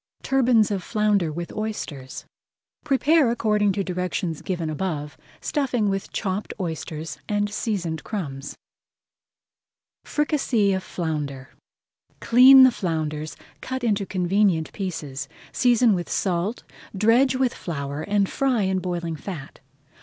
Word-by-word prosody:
TURBANS 245 -5 +3
OF 195 -2 -1
FLOUNDER 210 -5 +1
WITH 170 +2 -5
OYSTERS 170 -11 -5 0.6
Prepare 295 -1 +3
according 210 -3 +2
to 200 - -1
directions 180 -3 -3
given 175 -4 -3
above, 155 -2 -3 0.3
stuffing 250 -8 0
with 195 0 -3
chopped 195 0 -3
oysters 160 -3 -5
and 205 0 0
seasoned 175 - -2
crumbs. 145 -10 -5 1.5
FRICASSÉE 265 -10 +1
OF 190 - -2
FLOUNDER 150 -7 -4 0.7
Clean 260 +3 +8
the 260 - +7
flounders, 155 -5 -3 0.2
cut 260 -1 -4
into 205 -4 +1
convenient 185 -2 +1
pieces, 150 -8 -5 0.2
season 240 -2 +4
with 175 -2 -3
salt, 190 +4 -1 0.3
dredge 240 +6 +4
with 255 -1 +1
flour, 140 -3 -5
and 200 +2 +1
fry 255 -3 +1
in 190 0 +1
boiling 170 -2 -3
fat. 150 -3 -8
195 Hz, 115 wpm, -24 LUFS, 160-225 Hz, 1.5 s, Clean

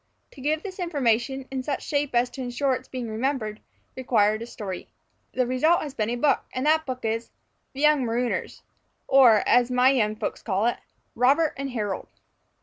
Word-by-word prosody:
To 275 - -13
give 305 +3 0
this 380 -1 -8
information, 265 -5 0
in 265 -1 -2
such 280 +1 -3
shape 285 -3 -1
as 245 +1 +2
to 270 - -7
insure 255 +2 0
its 255 - -5
being 250 -2 -5
remembered, 220 -1 -2 0.3
required 215 -4 +2
a 230 - -6
story. 195 -6 -7 0.5
The 255 - +1
result 280 +8 +2
has 290 -3 -6
been 215 -4 -1
a 240 - -1
book; 275 +4 +2 0.2
and 255 +2 -1
that 315 0 +3
book 255 -2 -4
is 225 +1 -2 0.4
"The 270 - -6
Young 300 -2 +4
Marooners" 240 +1 -2 0.4
or, 245 -6 +6
as 245 0 +4
my 250 +1 +4
young 215 -5 +1
folks - - -4
call 200 0 0
it, 240 - +1 0.4
"Robert 280 +6 +3
and 275 0 -4
Harold." 210 -6 -3
255 Hz, 185 wpm, -25 LUFS, 230-275 Hz, 0.5 s, or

